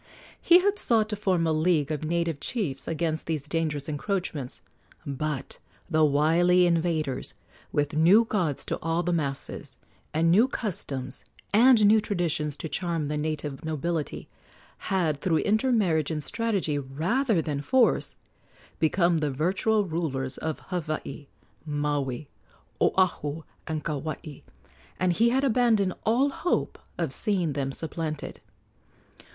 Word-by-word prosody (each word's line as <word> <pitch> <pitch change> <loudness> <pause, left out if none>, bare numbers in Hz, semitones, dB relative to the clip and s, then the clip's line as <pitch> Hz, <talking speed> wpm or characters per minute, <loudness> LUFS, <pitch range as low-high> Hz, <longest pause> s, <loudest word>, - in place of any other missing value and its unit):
He 350 - +7
had 405 +2 +1
sought 220 -2 +2
to 210 - -2
form 190 -5 +1
a 160 - +2
league 155 -2 +2
of 155 0 -3
native 165 -1 -1
chiefs 165 - -3
against 160 -1 -2
these 155 -3 -2
dangerous 150 -3 -2
encroachments; 155 -4 -3 0.4
but 140 0 -4 0.3
the 155 -1 +4
wily 165 +5 +4
invaders, 165 -5 0 0.4
with 145 +1 0
new 175 +9 +5
gods 175 -11 -1
to - - -3
awe 165 +2 0
the 175 +1 0
masses 140 -5 -3 0.3
and 165 +2 +2
new 220 +8 +5
customs 140 - -4 0.3
and 230 0 +6
new 215 +1 +6
traditions 165 -7 -2
to - - -4
charm 165 -3 -2
the 150 - -1
native 150 -1 -3
nobility, 160 0 -3 0.5
had, 160 -7 0
through 165 -3 +2
intermarriage 205 - +2
and 155 -2 -3
strategy 195 -8 -1
rather 175 - 0
than 150 -3 -2
force, 255 - +2 0.6
become 170 +1 +2
the 150 -1 0
virtual 190 +9 +1
rulers 140 -6 -3
of 160 -1 -3
Hawaii, 155 -4 -4 0.4
Maui, 145 -3 -2 0.5
Oahu, 160 -4 +1 0.2
and 155 -2 -3
Kauai, 155 0 -5 0.6
and 185 -1 +2
he 230 +6 +3
had 265 +3 +1
abandoned 225 -7 +3
all 250 +6 +3
hope 350 - -1 0.2
of - - -1
seeing 185 -8 0
them 135 -1 -2
supplanted. 155 +1 -4
165 Hz, 130 wpm, -27 LUFS, 150-195 Hz, 0.6 s, He